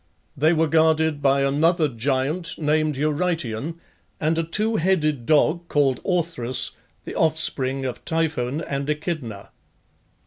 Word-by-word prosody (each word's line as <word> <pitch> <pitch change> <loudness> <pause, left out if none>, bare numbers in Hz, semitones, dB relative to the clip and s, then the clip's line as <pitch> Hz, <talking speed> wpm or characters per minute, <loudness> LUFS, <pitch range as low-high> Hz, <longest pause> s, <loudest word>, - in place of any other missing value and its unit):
They 155 +3 +3
were 160 -1 +2
guarded 160 -1 +2
by 140 0 +3
another 155 +4 +2
giant 135 +7 -2
named 155 -1 0
Eurytion, 155 -3 -1 0.4
and 160 +1 +1
a - - +1
two 215 +7 0
headed 155 -8 0
dog 160 +3 +2
called 140 -4 +1
Orthrus, 165 -9 0 0.3
the - - -7
offspring 135 -4 +1
of 125 -2 -5
Typhon 155 -4 -1
and 140 -1 -4
Echidna. 150 - -4
155 Hz, 125 wpm, -23 LUFS, 135-165 Hz, 0.4 s, They